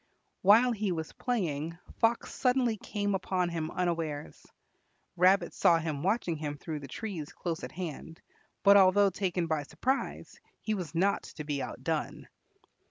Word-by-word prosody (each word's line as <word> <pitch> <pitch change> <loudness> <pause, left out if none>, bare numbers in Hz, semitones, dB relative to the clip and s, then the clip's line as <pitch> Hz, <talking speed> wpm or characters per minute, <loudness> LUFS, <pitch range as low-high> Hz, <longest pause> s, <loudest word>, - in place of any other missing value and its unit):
While 225 +6 +6
he 210 -4 -1
was 160 -2 -3
playing, 165 - -2 0.2
Fox 230 +1 +1
suddenly 250 -3 +2
came 205 0 -2
upon 185 -2 0
him 160 -2 -3
unawares. 165 -5 -3 0.7
Rabbit 185 +3 +4
saw 170 - +4
him 160 -3 -3
watching 185 -2 0
him 150 -1 -4
through 155 0 -5
the 140 - -9
trees 170 - -5
close 170 -2 -4
at 125 - -5
hand, 165 -1 -7 0.4
but 200 0 +8
although 195 +1 +5
taken 180 -2 -1
by 160 -2 0
surprise, 260 - -3 0.2
he 215 - 0
was 175 -7 -5
not 195 +4 +2 0.2
to 150 - -4
be 145 -2 -2
outdone. - - -3
180 Hz, 150 wpm, -30 LUFS, 160-205 Hz, 0.7 s, but